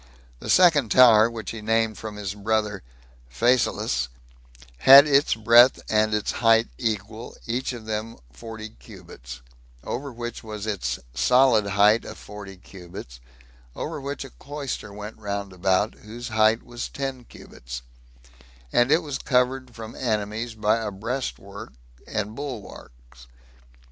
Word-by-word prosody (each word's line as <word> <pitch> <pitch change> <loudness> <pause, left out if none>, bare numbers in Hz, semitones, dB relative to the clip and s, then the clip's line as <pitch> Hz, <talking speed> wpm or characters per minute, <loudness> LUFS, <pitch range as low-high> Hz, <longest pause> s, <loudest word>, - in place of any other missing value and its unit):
The - - -8
second 155 -10 +5
tower, 115 -3 +7
which 115 -2 -6
he 115 - -7
named 110 0 +1
from 105 +3 -7
his 100 -2 -4
brother 105 0 -1 0.5
Phasaelus, 65 - +1 0.7
had 135 - +10
its 140 -3 +3
breadth 115 +3 +6
and 110 0 +2
its 105 - -1
height 115 -1 +3
equal, 110 0 -4
each 125 +3 -2
of 120 -3 -8
them 110 +1 -4 0.2
forty 110 - -8
cubits; 85 - -12 0.4
over 140 +3 -5
which 120 -1 -7
was 105 -1 -6
its 90 - -2 0.2
solid 110 - +4
height 105 +3 +4
of - - -9
forty 100 -2 -10
cubits; 90 -10 -11 0.6
over 145 - -5
which 140 0 -5
a 135 - -12
cloister 140 -7 -6
went 105 +2 -9
round 100 -2 -4
about, 95 +3 +1
whose 120 +3 -8
height 110 0 +3
was 120 0 -6
ten 135 -2 -5
cubits, - - -10 0.9
and 120 +3 +3
it 165 - +4
was 145 -3 -4
covered 125 -1 0
from 110 -1 -8
enemies 110 0 -3
by 110 +1 0
breast 115 +7 -4
works 100 +3 -11 0.3
and 105 0 -3
bulwarks. 60 - -10
110 Hz, 135 wpm, -24 LUFS, 100-120 Hz, 0.9 s, had